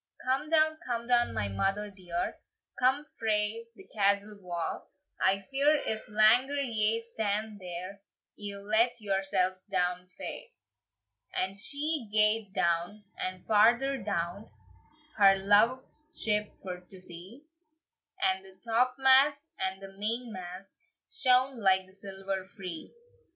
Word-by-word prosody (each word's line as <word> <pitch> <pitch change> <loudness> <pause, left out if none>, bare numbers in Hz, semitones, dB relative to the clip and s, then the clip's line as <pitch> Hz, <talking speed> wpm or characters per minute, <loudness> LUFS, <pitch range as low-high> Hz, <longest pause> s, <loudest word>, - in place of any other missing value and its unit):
"Come 270 +4 0
down, 315 -1 +4
come 235 -2 -3
down, 240 0 +3
my 105 -2 -2
mother 195 - -1
dear, 180 -3 -4 0.4
Come 265 +4 +2
frae 220 +1 0
the - - -14
castle 200 0 +1
wa! 175 -2 -3 0.4
I 190 +1 +3
fear, 280 +6 +2
if 220 -7 -2
langer 230 +7 +4
ye 225 -4 +1
stand 220 -2 -3
there, 185 +2 -7 0.3
Ye'll 200 -1 -6
let 225 +3 +2
yoursell 195 -2 0
down 180 -1 0
fa." 185 - -6 0.9
And 190 +1 -1
she 285 +3 -2
gaed 210 -1 +3
down, 175 +4 0
and 185 -1 -5
farther 240 +6 +4
down, 195 0 -3 0.7
Her 195 -2 +7
love's 240 +10 +2
ship 210 -1 0
for 180 -1 -5
to 180 +1 -15
see, 185 - -10 0.8
And 190 - +1
the 190 -1 -14
topmast 265 +5 +3
and 190 +1 -2
the 195 0 -10
mainmast 200 -4 -4 0.4
Shone 260 - +3
like 190 -2 +3
the 185 - -20
silver 195 -1 -5
free. 190 -5 -8
210 Hz, 125 wpm, -30 LUFS, 190-240 Hz, 0.9 s, Her